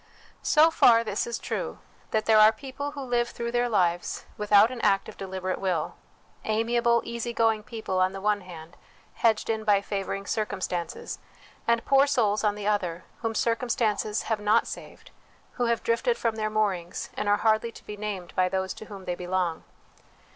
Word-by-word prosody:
So 315 +1 +5
far 230 -7 +6
is 215 -2 -2
this 235 -1 -3
true, - - -4 0.3
that 215 -1 0
there 220 -1 +5
are 215 +1 +8
people 270 +5 -6
who 285 - -6
live 240 -2 0
through 235 0 -4
their 245 0 +1
lives 175 -5 0
without 210 +2 +5
an 250 -2 -6
act 195 0 +2
of - - -9
deliberate 185 -1 -4
will: 180 -5 -1 0.5
amiable, 235 +1 +2
easy 235 0 -4
going 225 -2 +2
people, 220 -4 -3
on 185 0 +3
the 195 - -6
one 205 +1 +1
hand, 170 -2 -11 0.4
hedged 225 -2 +2
in 220 -1 -1
by 205 -2 +4
favouring 195 0 -4
circumstances; 185 -6 -3 0.5
and 235 0 +2
poor 275 +1 +5
souls, 215 -6 +1
on 210 -1 +2
the 210 -1 -6
other, 185 -5 -1 0.2
whom 225 -1 -2
circumstances 230 -2 0
have 220 -2 -1
not 210 +2 +3
saved, - - -9 0.4
who 245 - -1
have 235 -1 0
drifted 465 - +1
from 230 -2 -1
their 215 -1 -1
moorings, 200 -5 -1
and 205 - -1
are 205 - +4
hardly 220 +1 +2
to - - -15
be 210 - -6
named 205 -4 -5
by 185 0 +2
those 190 0 -2
to - - -10
whom 200 -3 -10
they 180 - -1
belong. 180 -2 -2
215 Hz, 185 wpm, -27 LUFS, 195-235 Hz, 0.5 s, are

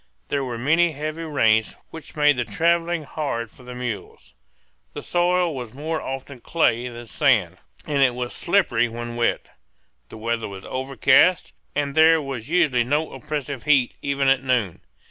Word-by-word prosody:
There 140 -1 0
were 125 -3 -4
many 160 +7 +2
heavy 155 +3 -5
rains, 110 -8 +2 0.2
which 160 -2 -11
made 150 -1 +4
the 125 - -1
travelling 170 +3 0
hard 125 -6 -4
for - - -18
the 125 0 -9
mules. 115 - -6 0.6
The - - -7
soil 175 -2 +1
was 125 -2 -7
more 155 +3 -3
often 135 0 -6
clay 125 -4 +1
than 120 -1 -8
sand, 110 - +1 0.3
and 145 -2 0
it 125 -3 +4
was 125 -1 -4
slippery 150 - +1
when 120 +1 -6
wet. 120 0 +1 0.7
The - - -10
weather 115 +1 -2
was 95 -1 -9
overcast, 135 +6 +2 0.2
and 140 -1 -1
there 160 +1 +6
was 135 -4 -6
usually 145 -8 +3
no 145 +6 -1
oppressive 145 -4 -5
heat 140 -5 +3
even 140 -1 0
at 135 -1 +4
noon. 120 -9 0
135 Hz, 165 wpm, -23 LUFS, 120-155 Hz, 0.7 s, there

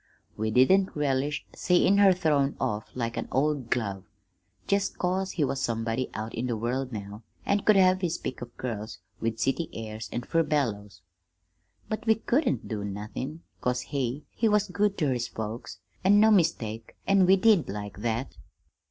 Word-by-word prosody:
We 110 +1 -1
didn't 185 - +4
relish 145 0 0
seein' 185 +2 +3
her 200 -1 +7
thrown 150 -6 +1
off 105 +1 -2
like 115 -2 -3
an - - -3
old 140 -2 0
glove, 100 -5 -1 0.6
jest 200 0 0
'cause 185 +1 -1
he 155 - 0
was 135 -1 -1
somebody 115 +2 -1
out 110 +1 -4
in 120 +3 -2
the 120 -3 -1
world 125 +4 -2
now, 105 -1 -7 0.2
an' 200 - +2
could 215 +1 +4
have 185 -1 +5
his 170 -2 0
pick 130 - -6
of 120 0 -9
girls 110 -3 -5 0.2
with 115 -1 -2
city 135 +7 0
airs 110 0 -6
and 120 0 -4
furbelows. 115 - -1 0.8
But 215 +1 -4
we 220 - +6
couldn't 245 +4 0
do 105 -3 -3
nothin', 105 +10 -5 0.2
'cause 125 0 0
he 135 +1 -3
he 225 - +1
was 210 -1 +2
good 205 +2 +1
ter 150 -6 +1
his 120 -1 -2
folks, 110 +2 -6 0.3
an' 200 +2 +6
no 220 +1 +6
mistake, 115 - +1
an' 195 -2 +4
we 190 - +7
did 200 - +4
like 105 0 -6
that. 115 +4 -2
130 Hz, 170 wpm, -27 LUFS, 115-185 Hz, 0.8 s, her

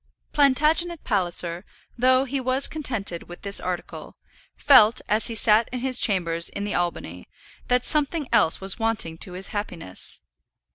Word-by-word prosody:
Plantagenet 305 +4 +2
Palliser, 175 -3 -1 0.3
though 255 +2 +3
he 275 +1 -3
was 260 +2 +1
contented 225 - -4
with 175 - -11
this 200 0 +2
article, 180 -1 -6 0.4
felt, 230 -5 +5
as 215 +1 +2
he 230 - -5
sat 215 +1 +3
in 250 -1 -5
his 255 -1 +1
chambers 170 -5 +1
in 200 - -5
the 205 - -3
Albany, 130 - -4 0.4
that 250 0 +1
something 300 -1 +1
else 160 - +3
was 195 +3 -1
wanting 220 -8 -2
to 185 - -5
his 185 +2 -5
happiness. 175 - -5
215 Hz, 150 wpm, -23 LUFS, 180-260 Hz, 0.4 s, felt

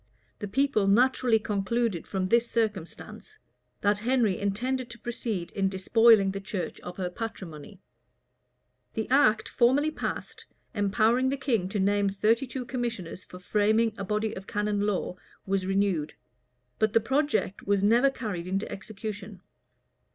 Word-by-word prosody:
The 205 - -4
people 220 -2 +1
naturally 245 +2 +4
concluded 215 -2 -1
from 190 -2 -1
this 235 +2 +3
circumstance, 220 - -4 0.4
that 205 0 +2
Henry 230 -4 +1
intended 245 +6 -2
to 235 - -9
proceed 220 -6 -4
in 195 -1 0
despoiling 200 +1 +4
the 195 - -4
church 195 -2 -4
of 180 0 -9
her 180 -2 -3
patrimony.[v] 190 -4 -7 1.2
The 220 - -2
act 235 -6 +4
formerly 270 +6 +3
passed, - - -5 0.3
empowering 225 +4 +2
the 275 - -1
king 230 -10 0
to 205 - -2
name 200 +1 +2
thirty 220 +6 +1
two 250 +1 -5
commissioners 235 -9 -4
for 180 - -12
framing 215 +4 +2
a 200 - -5
body 210 +2 -1
of 190 - -9
canon 210 0 -1
law, 200 -3 -1 0.3
was 190 -1 -1
renewed; 195 -6 0 0.6
but 215 -1 +2
the - - +6
project 265 -4 -1
was 200 -1 +2
never 235 +6 +5
carried 205 -10 -5
into 195 +3 -1
execution. 205 -1 -7
210 Hz, 145 wpm, -27 LUFS, 195-235 Hz, 1.2 s, the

